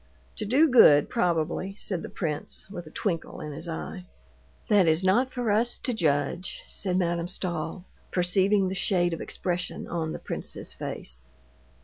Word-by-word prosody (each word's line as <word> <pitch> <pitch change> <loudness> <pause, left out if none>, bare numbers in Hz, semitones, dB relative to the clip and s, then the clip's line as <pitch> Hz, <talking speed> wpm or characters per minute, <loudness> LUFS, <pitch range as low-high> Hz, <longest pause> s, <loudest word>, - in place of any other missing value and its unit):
"To - - -2
do 270 +10 +5
good, 150 - +7
probably," 175 +3 0
said 185 -5 -2
the - - -7
prince 155 -5 -4
with 175 -5 -7
a - - -9
twinkle 165 0 -3
in 150 - -5
his 160 +4 -6
eye. 180 +2 -6 0.6
"That 200 -5 +5
is 160 +3 +3
not 240 +8 +3
for 245 -4 -1
us 230 +3 +2
to 250 - -2
judge," 160 -1 0
said 185 -3 -1
Madame 170 -1 0
Stahl, 175 -1 -4 0.3
perceiving 190 +2 +3
the 185 - -2
shade 180 -2 +2
of 165 - -4
expression 180 0 -3
on 160 -2 -2
the - - -4
prince's - - -4
face. 60 +1 -5
180 Hz, 160 wpm, -27 LUFS, 165-195 Hz, 0.6 s, good